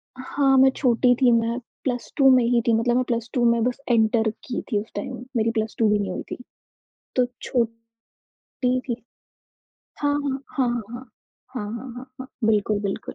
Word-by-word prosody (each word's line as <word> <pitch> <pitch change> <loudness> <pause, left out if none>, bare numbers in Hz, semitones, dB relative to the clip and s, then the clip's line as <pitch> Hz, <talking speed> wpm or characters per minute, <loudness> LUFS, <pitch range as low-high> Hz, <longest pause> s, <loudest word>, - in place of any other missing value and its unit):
हाँ, 270 +1 +1
मैं 265 +1 +7
छोटी 245 -1 +3
थी, 250 -2 +6
मैं 230 0 +2 0.3
प्लस 245 -3 -3
2 270 -2 +6
में 250 - +4
ही 235 0 +3
थी 230 - +4
मतलब 235 +2 +2
मैं 255 - +3
प्लस 235 0 -2
2 245 - +1
में 235 -1 +1
बस 250 +2 -1
एंटर 220 -1 +3 0.2
की 250 - -3
थी 210 - +2
उस 220 - -13
टाइम, - - -4 0.2
मेरी 225 0 +2
प्लस 220 -1 -2
2 225 -2 +4
भी 210 0 +3
नहीं 200 -2 -2
हुई - - -4
थी, - - -4 0.8
तो 250 -1 +4 0.2
छोटी 230 -2 -2 0.9
थी। 250 - -3 1.1
हाँ, 290 0 +2 0.4
हाँ, 260 -3 +2
हाँ, 240 -1 -1
हाँ। 240 0 -9 0.4
हाँ, 245 - -3
हाँ, 240 +2 -7
हाँ, 250 +1 -8
हाँ। 260 - -6 0.2
बिल्कुल, 215 -1 +2
बिल्कुल। 200 -1 -4
235 Hz, 185 wpm, -24 LUFS, 225-255 Hz, 1.1 s, मैं